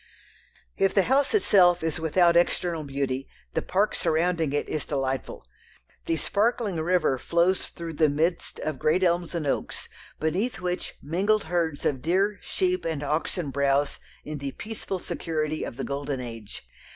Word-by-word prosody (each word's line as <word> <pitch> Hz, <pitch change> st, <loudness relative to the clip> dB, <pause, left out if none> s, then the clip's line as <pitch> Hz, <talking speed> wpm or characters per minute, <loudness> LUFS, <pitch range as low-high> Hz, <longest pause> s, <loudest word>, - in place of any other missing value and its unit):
If 195 Hz, 0 st, +2 dB
the 195 Hz, -, +5 dB
house 275 Hz, -, +2 dB
itself 180 Hz, -, +5 dB
is 160 Hz, -1 st, -1 dB
without 170 Hz, +2 st, +4 dB
external 170 Hz, -1 st, +2 dB
beauty, 135 Hz, -1 st, -2 dB, 0.3 s
the -, -, 0 dB
park 200 Hz, +3 st, +1 dB
surrounding 165 Hz, -2 st, +1 dB
it 145 Hz, -, -1 dB
is 155 Hz, -, -2 dB
delightful. 135 Hz, -, -3 dB, 0.6 s
The 165 Hz, -, +1 dB
sparkling 215 Hz, 0 st, 0 dB
river 165 Hz, -6 st, +2 dB
flows 170 Hz, +6 st, +2 dB
through 170 Hz, -2 st, -7 dB
the 155 Hz, 0 st, +3 dB
midst 165 Hz, +4 st, 0 dB
of 155 Hz, -3 st, -3 dB
great 170 Hz, +5 st, +2 dB
elms 175 Hz, 0 st, +1 dB
and 165 Hz, -3 st, -2 dB
oaks 140 Hz, -, -2 dB, 0.3 s
beneath 185 Hz, +7 st, 0 dB
which 180 Hz, 0 st, -3 dB
mingled 200 Hz, +8 st, +1 dB
herds 160 Hz, -3 st, -1 dB
of 135 Hz, -3 st, +1 dB
deer, 195 Hz, +7 st, +1 dB
sheep, 365 Hz, -1 st, 0 dB
and 160 Hz, -3 st, -2 dB
oxen 150 Hz, +1 st, -1 dB
browse 140 Hz, +1 st, +1 dB, 0.3 s
in 150 Hz, -1 st, -5 dB
the 140 Hz, -1 st, -4 dB
peaceful 215 Hz, -3 st, -5 dB
security 155 Hz, -3 st, -2 dB
of 120 Hz, -, -6 dB
the 135 Hz, -, -3 dB
golden 140 Hz, -1 st, -3 dB
age. 115 Hz, -4 st, -8 dB
165 Hz, 155 wpm, -26 LUFS, 145-185 Hz, 0.6 s, the